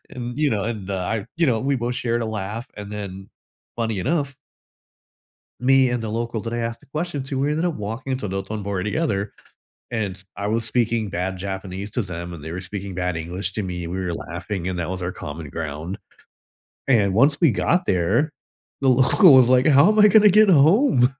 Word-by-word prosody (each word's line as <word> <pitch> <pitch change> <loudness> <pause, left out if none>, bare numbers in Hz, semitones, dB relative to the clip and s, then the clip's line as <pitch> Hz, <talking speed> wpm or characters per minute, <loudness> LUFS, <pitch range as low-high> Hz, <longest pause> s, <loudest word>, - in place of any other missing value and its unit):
And, 120 +1 -6
you 150 -2 +2
know, 105 -4 -1
and 105 -4 -4
I, 100 +3 -2
you 165 -2 +2
know, 115 -4 +1
we 135 0 0
both 120 +1 -2
shared 120 -1 -1
a - - -2
laugh 110 +3 -4
and 105 0 -8
then 95 -1 -7 0.5
funny 115 -3 -1
enough 140 - -1 1.3
me 130 0 +5
and 120 -1 -1
the 110 - -4
local 115 +1 -3
that 115 0 -5
I 120 - -2
asked 115 0 -3
the - - -22
question 155 0 -4
to, 135 0 -4
we 140 +2 +1
ended 160 +3 0
up 170 - 0
walking 115 +6 -4
to 105 -6 -5
Dotonbori 95 0 -3
together, 105 -6 -1 0.6
and 105 -5 -2
s 95 - -12
I 100 0 -3
was 115 +1 0
speaking 115 -3 0
bad 95 +1 -3
Japanese 95 +1 -5
to 120 - -1
them, 85 -2 -6
and 80 - -9
they 80 - -6
were 90 - -5
speaking 95 0 -6
bad 90 -2 -2
English 90 +3 -4
to 110 - -2
me 90 -1 -4
and 85 - -5
we 95 - -2
were 90 -2 -2
laughing, 90 +2 -5
and 90 -1 -3
that 85 - -3
was 95 0 -4
our 90 +1 -2
common 75 -2 -7
ground. 80 +5 -5 0.9
And 105 -7 +3
once 140 +7 +4
we 160 -7 +5
got 175 - +1
there, 100 - +1 0.5
the 135 - +1
local 135 - +6
was, 125 -2 +7
like, 130 +2 +4
how 145 +4 +6
am 215 0 +2
I 210 - +8
gonna 210 -1 +6
get 210 +1 +5
home? 155 - +4
110 Hz, 210 wpm, -22 LUFS, 95-135 Hz, 1.3 s, I